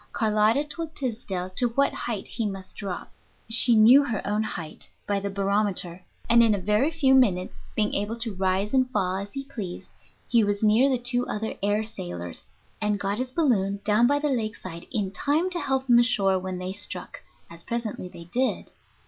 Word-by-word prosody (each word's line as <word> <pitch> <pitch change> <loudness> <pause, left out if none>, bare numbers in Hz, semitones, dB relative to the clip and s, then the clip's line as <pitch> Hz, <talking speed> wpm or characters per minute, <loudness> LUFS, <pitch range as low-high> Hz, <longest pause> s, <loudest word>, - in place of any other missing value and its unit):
Carlotta 215 +4 +2
told 320 +1 -6
Tysdell 210 -8 -4
to 245 +5 +1
what 280 0 +2
height 220 -5 -4
he 225 - -2
must 195 -2 -8
drop 195 -4 -6 0.4
(she 230 +1 +6
knew 235 +6 +7
her 230 -7 -2
own 210 +1 0
height 165 -7 -6 0.2
by 200 -1 0
the 200 0 -3
barometer), 195 -3 -1 0.2
and 235 0 +6
in 225 -2 +4
a - - -3
very 210 - +2
few 300 -5 +2
minutes, 200 -9 +3 0.2
being 210 -1 +1
able 205 +3 -1
to 230 -2 -2
rise 190 +3 0
and 260 -1 +3
fall 190 -6 0
as 200 +1 -6
he 275 - -4
pleased, 215 -10 -7 0.4
he 235 -2 +3
was 205 0 -1
near 220 +6 +5
the 260 - +2
two 245 0 -1
other 220 +1 -3
air 205 +2 +1
sailors, 90 - -7 0.3
and 210 -1 0
got 200 +2 -2
his 255 0 -2
balloon 225 - +1
down 215 +3 +4
by 285 +2 +3
the 295 +1 -1
lake 220 -4 -1
side 170 -1 -9
in 195 -3 -1
time 300 - 0
to 350 - 0
help 265 -3 -1
them 240 -2 +6
ashore 200 -6 +2
when 185 0 -5
they 180 +1 -4
struck, 200 +1 -5 0.3
as 170 0 -10
presently 230 -6 -4
they 170 - -11
did. 250 +10 -2
215 Hz, 195 wpm, -25 LUFS, 195-250 Hz, 0.4 s, knew